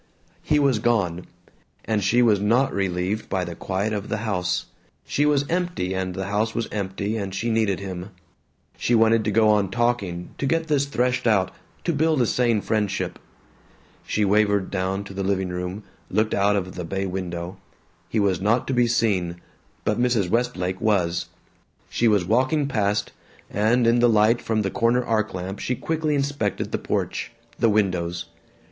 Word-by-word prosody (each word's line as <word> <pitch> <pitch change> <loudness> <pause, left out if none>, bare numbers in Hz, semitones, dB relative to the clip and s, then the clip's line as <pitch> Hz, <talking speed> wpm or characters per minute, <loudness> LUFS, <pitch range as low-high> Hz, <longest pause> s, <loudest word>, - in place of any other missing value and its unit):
He 150 - +2
was 140 -6 +3
gone. 100 -7 0 0.6
And 110 -2 0
she 120 +6 +4
was 105 -4 +4
not 115 +7 +2
relieved 95 +2 -1
by 95 -1 0
the 85 - -5
quiet 95 +5 -2
of 105 -1 -4
the - - -1
house. 90 -4 -1 0.4
She 145 +1 +1
was 145 -1 +2
empty 175 - -1
and 95 -1 -2
the 95 - -3
house 105 +3 -1
was 115 - -1
empty 100 +1 -2
and 100 -2 -4
she 115 +4 -1
needed 110 -4 +1
him. 95 -1 -6 0.7
She 120 - +1
wanted 115 0 +4
to - - +1
go 110 +1 +4
on 105 -3 +3
talking, 100 -6 -1
to 140 - 0
get 165 +3 +1
this 145 -3 +1
threshed 125 -2 0
out, 100 -5 +3 0.3
to 170 - 0
build 155 0 +2
a 120 - +4
sane 115 -2 +2
friendship. 100 -5 -1 0.8
She 105 - 0
wavered 100 -1 +2
down 95 +1 -1
to 100 - -10
the 100 - -3
living 95 -1 0
room, 90 +3 -4 0.3
looked 110 +3 +1
out 100 +1 +3
of 95 -2 -2
the 90 - -5
bay 95 +3 -2
window. 90 -1 -4 0.5
He 110 - 0
was 95 -4 +1
not 115 +5 +2
to - - +1
be 120 -1 +3
seen. 95 -7 0 0.5
But 105 +2 +1
Mrs. 115 -7 +1
Westlake 95 -6 -1
was. 90 -6 +1 0.6
She 120 - +2
was 105 -5 +3
walking 130 - +2
past, 105 -5 0 0.4
and 115 +4 +2
in 115 +1 +4
the 120 0 +5
light 110 +2 +4
from 110 -1 0
the 95 - -1
corner 120 +1 +2
arc 110 -4 0
lamp 95 +2 -5
she 125 - -1
quickly 155 +2 -1
inspected 140 -8 -1
the - - -1
porch, - - -2 0.3
the 115 - +4
windows. 90 -5 0
105 Hz, 180 wpm, -24 LUFS, 95-120 Hz, 0.8 s, the